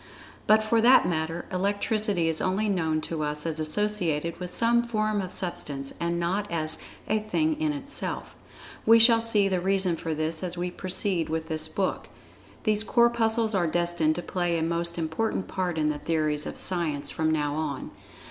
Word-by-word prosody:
But 215 +1 +5
for 225 +1 +2
that 250 +3 +6
matter, 165 0 -2
Electricity 200 -1 +1
is 160 -1 0
only 195 +4 0
known 160 -6 0
to 160 0 -4
us 150 0 -1
as 160 -1 -2
associated 170 -2 -1
with 180 -1 -6
some 235 +3 +3
form 215 -3 -1
of 185 -1 -6
Substance, 140 -6 -3
and 170 0 -1
not 195 +4 -1
as 155 -2 0 0.3
"a 215 - +1
thing 310 +9 -1
in 310 -1 +1
itself." 285 -1 -5 0.5
We 225 +1 +7
shall 230 0 +7
see 215 -3 +2
the 185 -2 0
reason 190 -2 +1
for 160 -1 -4
this 155 +1 -2
as 180 -1 -4
we 180 +1 -2
proceed 185 -3 -1
with 160 +1 -3
this 155 0 -1
book. 185 +4 -2 0.6
These 215 -2 +2
Corpuscles 230 -1 +2
are 180 -4 +2
destined 170 -1 +1
to 175 - -4
play 175 -2 -1
a 160 - -1
most 170 +1 -2
important 170 +5 -2
part 180 -3 -2
in 155 -1 +1
the 150 -1 -2
theories 155 -2 -1
of - - -7
Science 165 -6 -1
from 160 0 0
now 150 -2 0
on. 150 -3 -4
175 Hz, 180 wpm, -26 LUFS, 160-215 Hz, 0.6 s, We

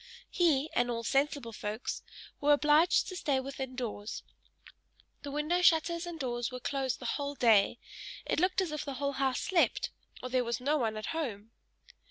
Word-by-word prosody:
He, 310 -5 +3
and 245 0 +2
all 230 -1 -2
sensible 275 0 0
folks, 210 +3 -4 0.4
were 295 0 +5
obliged 300 +4 +4
to 370 - -6
stay 285 -6 0
within 265 -1 -5
doors 220 -4 -5 1.0
the 285 - -6
window 300 +5 0
shutters 340 0 +3
and 340 -2 -6
doors 240 -3 -2
were 250 - -5
closed 265 -1 -1
the - - -9
whole 285 0 -2
day; 225 -4 +4 0.5
it - - 0
looked 365 +2 +2
as 360 -4 -2
if 305 -1 -3
the 275 -2 -5
whole 280 +1 -1
house 265 -2 0
slept, 365 -3 +1 0.3
or 255 - -4
there 255 0 +2
was 235 -1 -2
no 285 +4 +1
one 220 -3 -1
at 215 - -4
home. 225 -9 -4
275 Hz, 180 wpm, -31 LUFS, 240-305 Hz, 1.0 s, were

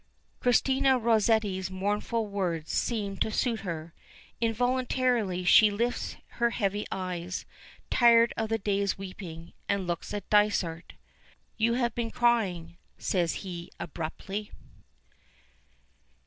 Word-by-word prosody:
Christina 265 +2 +3
Rosetti's 220 -5 +2
mournful 205 +4 -1
words 180 -6 -2
seem 205 -4 -1
to - - 0
suit 225 +1 0
her. 165 -3 -5 0.5
Involuntarily 245 -4 +1
she 210 +4 +7
lifts 235 +4 -2 0.3
her 235 - +5
heavy 205 -2 -1
eyes, 180 -1 -4 0.5
tired 235 -1 +6
of 220 -1 -2
the 225 - +1
day's 200 -1 0
weeping, 180 -3 -8 0.2
and 200 -2 +1
looks 175 -1 -3
at 205 -2 -5
Dysart. 200 -5 +2 0.6
"You 230 +1 +2
have 240 -2 0
been 235 -1 -2
crying," 190 -9 +1 0.2
says 175 -3 0
he 175 -2 -6
abruptly. 185 +6 -5
205 Hz, 110 wpm, -28 LUFS, 180-230 Hz, 0.6 s, she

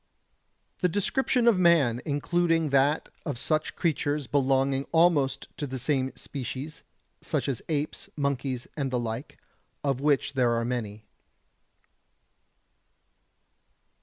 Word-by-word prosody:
The 180 - +2
description 240 - +1
of 220 -6 +5
man, 150 -9 +4
including 165 +2 +1
that 140 +3 +3 0.2
of 145 -6 -3
such 155 +5 -1
creatures 150 -3 0
belonging 135 +1 +1
almost 150 -6 +3
to 145 - -3
the 130 0 -4
same 130 0 0
species, 140 +2 -6 0.4
such - - -2
as 135 -5 -2
apes, 150 -1 -2
monkeys 135 -3 -1
and 140 -3 -1
the 130 - -1
like, 120 +4 -5 0.5
of 135 -2 0
which 145 -1 +2
there 125 -3 +2
are 115 0 0
many. 110 -4 -4
140 Hz, 115 wpm, -27 LUFS, 130-155 Hz, 0.5 s, of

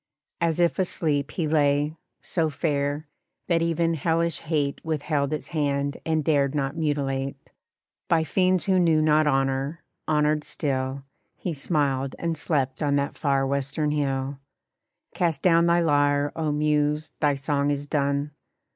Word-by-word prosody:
As 165 -1 0
if 170 +1 +2
asleep 150 -6 0
He 165 -4 -2
lay, 145 0 +2 0.3
so 165 -3 0
fair, 145 0 -1 0.4
that 170 -2 +2
even 165 0 +1
hellish 165 +1 0
hate 150 -3 -2
Withheld 150 -2 -1
its 155 - -4
hand 140 -3 -1
and 160 -1 0
dared 140 -2 +2
not 135 -1 -1
mutilate. 140 -4 -2 0.6
By 165 -1 +3
fiends 185 +3 +2
who 190 -2 +3
knew 165 -3 +4
not 155 0 +3
honor, 135 +3 0 0.2
honored 150 0 +2
still, 135 -2 -2 0.3
He 175 - -3
smiled 140 -3 -1
and 165 -1 -2
slept 140 -4 -1
on 145 -2 +2
that 140 0 -1
far 140 -2 +1
western 140 +2 -1
hill. 135 -2 -1 0.7
Cast 165 -5 -1
down 170 -1 +5
thy 170 0 +4
lyre, 145 -2 +2
oh 155 -2 -1
Muse! 150 0 0
thy 145 -2 +2
song 140 +1 0
is 145 0 -1
done! 140 0 0
150 Hz, 145 wpm, -25 LUFS, 140-160 Hz, 0.7 s, down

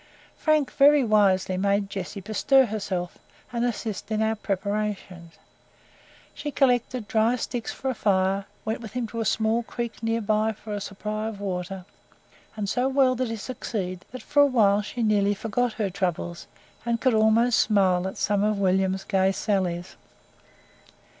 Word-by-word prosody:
Frank 310 -3 +1
very 290 0 +5
wisely 195 -4 +3
made 200 +1 +1
Jessie 195 0 -6
bestir 260 +6 +3
herself, 195 -5 -4 0.3
and 235 0 0
assist 225 -4 -3
in 215 -1 -1
our 220 0 +1
preparations. 200 -4 -3 1.0
She 295 - -5
collected 250 -4 +1
dry 225 +3 +2
sticks 245 -1 -4
for 265 - -3
a - - -3
fire, 195 -2 +1 0.2
went 220 +2 -2
with 220 -2 -9
him 250 -1 -2
to 230 - -5
a 225 - -1
small 220 +2 +1
creek 235 0 -6
near 225 0 0 0.3
for 215 0 -8
a 205 - -3
supply 210 +2 -4
of 220 -3 -6
water; 185 -1 -4 0.7
and 210 -2 -3
so 250 +6 +1
well 265 -1 +3
did 255 0 -1
he 225 - -3
succeed, 200 -5 -5
that 255 - -8
for 290 -1 +3
a 285 - +7
while 210 -6 +3
she 235 +3 -4
nearly 205 -2 +2
forgot 225 +3 -1
her 210 -4 -2
troubles, 175 -2 -3 0.4
and 235 0 0
could 255 -1 +2
almost 220 +2 +4
smile 190 -4 +3
at 190 - -6
some 205 -1 +1
of 210 0 +1
William's 190 0 +1
gay 190 -1 +2
sallies. 185 -3 -2
215 Hz, 160 wpm, -25 LUFS, 195-235 Hz, 1.0 s, a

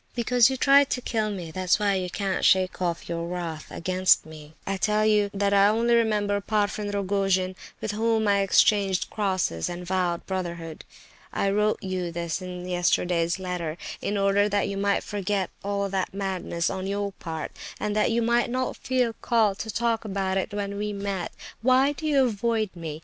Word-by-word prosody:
Because 245 0 +4
you 265 - -2
tried 275 +1 +5
to - - -1
kill 220 -3 -1
me—that's 185 -1 0
why 205 -1 +1
you 185 -1 -1
can't 195 0 -2
shake 185 -1 +3
off 170 -2 -2
your 170 0 -3
wrath 170 -3 -5
against 185 +2 +2
me. 155 -1 -12
I 195 0 -2
tell 210 +2 +2
you 210 -1 +3
that 200 0 0
I 200 0 +6
only 230 +3 +2
remember 215 -3 +2
the - - -10
Parfen 205 0 -1
Rogojin 195 -2 0 0.2
with 220 - -3
whom 220 0 +1
I 200 0 +4
exchanged 195 -1 +3
crosses, 185 - -1
and 175 0 -6
vowed 180 -2 -1
brotherhood. 170 -4 -5 0.5
I 195 - 0
wrote 210 +1 +1
you 185 -2 -3
this 170 +1 -3
in 180 -1 -6
yesterday's 175 0 +1
letter, 180 -4 -4 0.2
in 205 - -1
order 200 +1 +3
that 205 0 +1
you 200 - -3
might 200 0 +1
forget 200 -2 -2
all 200 0 -1
that 190 0 -2
madness 190 -4 -2
on 190 0 -4
your 200 0 -2
part, 165 -4 -6 0.3
and 210 0 -2
that 215 - +3
you 235 0 +1
might 235 +1 +2
not 255 +1 -2
feel 250 -3 0
called 220 -4 +2
to 220 - -5
talk 230 +1 0
about 195 -2 -2
it 190 +3 -1
when 200 0 -3
we 210 0 -2
met. 200 -3 -3 0.3
Why 260 +3 +4
do 310 +2 -5
you 280 -3 +4
avoid 220 -1 0
me? 160 -3 -6
200 Hz, 185 wpm, -26 LUFS, 180-215 Hz, 0.5 s, I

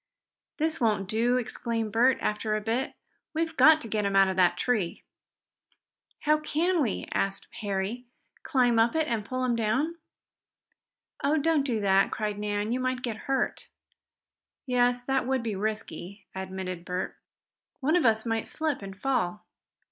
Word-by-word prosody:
"This 320 0 0
won't 210 -4 +1
do!" 235 +4 +2
exclaimed 230 -2 -2
Bert, 245 +4 +4
after 215 0 0
a - - 0
bit. 230 +5 -1 0.4
"We've 325 0 -1
got 315 0 +7
to 230 - -6
get 215 -1 0
him 200 -1 0
out 195 -1 +6
of 190 - -2
that 180 -1 +3
tree." 210 -6 -1 1.2
"How 305 0 +3
can 330 +3 +1
we?" 235 -8 -1
asked 195 0 -1
Harry. 205 +4 -2 0.4
"Climb 245 -5 +2
up 230 +5 +3
it, 315 -1 +2
and 225 -3 -1
pull 255 +4 -2
him 245 -2 +1
down?" 260 +10 0 1.3
"Oh, 290 +3 +3
don't 315 0 +3
do 250 -5 -1
that!" 195 -1 +4
cried 210 -1 -3
Nan. 210 +1 -1
"You 250 - 0
might 255 0 -1
get 235 -3 -2
hurt." 270 - 0 1.0
"Yes, 245 -1 +2
that 265 -2 0
would 265 -2 0
be 220 -3 -2
risky," 205 -1 -4
admitted 190 -2 -5
Bert. 180 +1 -3 0.6
"One 300 +5 +2
of 355 - +3
us 220 -1 +3
might 225 -1 -1
slip 310 -6 -1
and 195 0 -9
fall. 215 -7 -1
230 Hz, 160 wpm, -28 LUFS, 205-265 Hz, 1.3 s, got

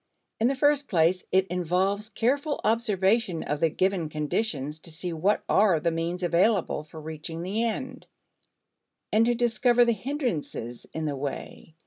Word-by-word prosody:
In 225 - +3
the 270 - +1
first 290 +1 +2
place, 175 +1 +2
it 190 0 +4
involves 190 +4 0
careful 280 +7 0
observation 210 -4 +1
of 150 - -2
the 165 - +3
given 185 -1 0
conditions 150 -1 -2
to 165 - -10
see 170 +2 -4
what 185 +6 +1
are 195 -5 +4
the 170 +2 0
means 170 +2 -3
available 175 -1 +2
for 155 +1 -11
reaching 160 +2 -6
the 205 +5 -1
end, 235 +3 -4 1.0
and 225 +2 +4
to 240 - +2
discover 240 0 +3
the 235 - +3
hindrances 220 - -3
in 160 0 -4
the 145 -2 -1
way. 140 +3 -6
185 Hz, 155 wpm, -27 LUFS, 160-230 Hz, 1.0 s, it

